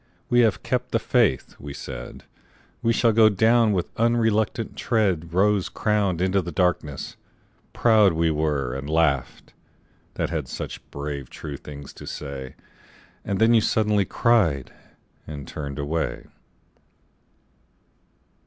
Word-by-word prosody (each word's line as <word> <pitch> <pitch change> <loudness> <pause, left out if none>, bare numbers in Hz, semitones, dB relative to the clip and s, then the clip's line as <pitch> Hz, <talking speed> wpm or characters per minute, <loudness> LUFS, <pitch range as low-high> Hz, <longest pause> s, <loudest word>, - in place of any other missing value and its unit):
We 120 - +5
have 110 -5 +3
kept - - -2
the - - +4
faith!" - - +1
we 70 -1 -8
said; - - -8 0.6
"We 115 - +2
shall 115 0 +3
go 110 0 +6
down 110 +3 +3
with 90 -4 0
unreluctant 115 -2 +1
tread 95 -8 0
Rose 100 +2 +2
crowned 100 -5 0
into 95 +1 +2
the 85 0 -6
darkness!"... 80 -4 -1 0.5
Proud 110 -5 +4
we 80 0 +1
were, 75 -5 -1
And 70 +2 -5
laughed, 80 -4 0 0.6
that - - -2
had 80 -6 -2
such - - -6
brave 70 -2 -5
true 75 -2 -7
things 70 0 -10
to - - -11
say. 70 -3 -6 0.7
And 100 - -2
then 115 +3 +4
you 115 - +5
suddenly 105 -3 +2
cried, 95 - +1 0.5
and 70 -3 -7
turned 70 -2 -6
away. 75 +3 -2
85 Hz, 130 wpm, -24 LUFS, 75-110 Hz, 0.7 s, go